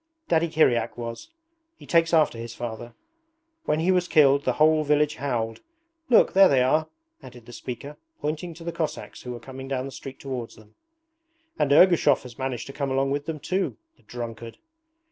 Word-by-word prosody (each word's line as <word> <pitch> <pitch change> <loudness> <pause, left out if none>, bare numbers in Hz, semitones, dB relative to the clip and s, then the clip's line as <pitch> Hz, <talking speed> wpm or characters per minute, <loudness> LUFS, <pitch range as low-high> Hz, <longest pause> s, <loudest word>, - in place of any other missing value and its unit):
Daddy 165 0 +2
Kiryak 155 -7 +2
was: 115 - -7 0.5
he - - -15
takes 165 -1 +3
after 155 -8 +3
his 115 0 -7
father. 120 0 -7 0.7
When 150 - +1
he 175 +4 +2
was 180 -1 +1
killed 140 -3 +4
the - - +2
whole 155 0 +4
village 150 0 +1
howled. 115 -5 -3 0.5
Look, 235 - +5
there 195 0 +7
they 130 -3 +4
are,' 155 +5 +2 0.3
added 120 -2 -13
the 120 - -12
speaker, 130 +5 -7 0.2
pointing 155 +3 -4
to 165 - -11
the 170 - -3
Cossacks 165 -2 -5
who 125 - -7
were 120 - -6
coming 130 +3 -9
down 130 -1 -2
the 135 - -7
street 135 0 -9
towards 130 -4 -6
them. 110 0 -19 0.9
'And 140 - +1
Ergushov 160 -2 +5
has 125 -1 -12
managed 130 -2 -3
to 135 - -9
come 140 -1 -2
along 135 +1 0
with 145 +1 -2
them 160 -2 -4
too! 185 +5 -2 0.2
The - - -29
drunkard!' 115 -1 -8
140 Hz, 185 wpm, -25 LUFS, 120-155 Hz, 0.9 s, there